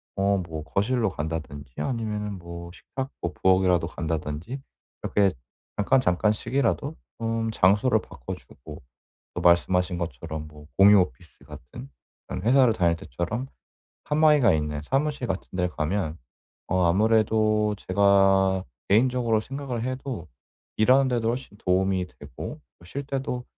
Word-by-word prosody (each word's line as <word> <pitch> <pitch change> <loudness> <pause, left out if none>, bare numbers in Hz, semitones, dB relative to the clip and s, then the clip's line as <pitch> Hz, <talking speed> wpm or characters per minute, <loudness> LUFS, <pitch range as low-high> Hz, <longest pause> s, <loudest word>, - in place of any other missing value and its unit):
어 100 0 +2
뭐 80 -4 -5
거실로 110 +8 0
간다든지 75 -5 -6
아니면은 105 -5 -3
뭐 85 0 -8
식탁 135 +7 -6
뭐 85 - -2
부엌이라도 90 -1 +3
간다든지 80 - -4 0.4
이렇게 100 -3 +2 0.4
잠깐, 105 +6 +3
잠깐씩이라도 120 - 0 0.2
좀 115 0 -1
장소를 105 +4 +3
바꿔주고 65 - -10 0.5
또 - - -2
말씀하신 90 +1 +3
것처럼 80 -1 -5
뭐 75 -1 -14
공유 100 +1 +8
오피스 65 -8 -6
같은 65 +2 -11 0.4
그런 - - -4
회사를 125 +1 +5
다닐 85 -5 +2
때처럼 85 - -4 0.6
칸막이가 150 - +4
있는 75 -1 -1
사무실 140 - -1
같은 95 -2 -3
데를 90 -1 +1
가면 80 +1 -2 0.5
어 95 0 +1
아무래도 110 +2 +3
제가 95 -1 +4 0.3
개인적으로 115 +1 +3
생각을 135 -2 -5
해도 130 -7 -4 0.5
일하는 130 +5 +5
데도 115 -2 0
훨씬 120 -3 -5
도움이 95 0 +1
되고 - - -8 0.2
어 85 - -17
쉴 140 +11 -5
때도 135 -3 -3
100 Hz, 305 characters per minute, -25 LUFS, 85-120 Hz, 0.6 s, 공유